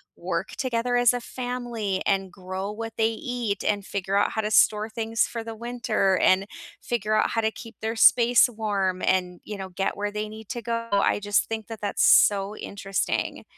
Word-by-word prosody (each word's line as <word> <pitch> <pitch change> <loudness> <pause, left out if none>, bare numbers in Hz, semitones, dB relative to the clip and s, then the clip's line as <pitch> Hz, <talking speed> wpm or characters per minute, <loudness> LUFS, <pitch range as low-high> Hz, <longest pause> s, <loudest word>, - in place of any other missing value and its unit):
work - - -3
together 245 -3 -1
as 245 0 +5
a 245 - -1
family, 240 -6 -3
and 195 -2 0
grow 190 +2 -5
what 225 +1 -6
they 220 0 +3
eat, 230 -3 -3
and 205 -1 0
figure 195 0 -3
out 205 - +3
how 220 - -1
to 210 0 -3
store 215 0 +4
things 225 +1 0
for 230 -1 -5
the 225 0 -7
winter, 230 -4 0
and 190 +1 +3 0.4
figure 215 -2 -1
out 215 - +2
how 225 - 0
to 220 - +1
keep 230 0 -11
their 225 +1 -2
space 240 +2 +6
warm 200 -5 -2
and, 180 -1 0
you 210 -1 -7
know, 190 -1 -6
get 195 +2 -2
where 205 0 -2
they 210 0 -4
need 220 0 -11
to 240 -2 -4
go. 230 0 -3
I 200 0 +2
just 205 0 +1
think 220 -2 -4
that 225 -2 -8
that's 205 - 0
so 200 0 +5
interesting. 195 -1 -3
215 Hz, 200 wpm, -25 LUFS, 200-230 Hz, 0.4 s, space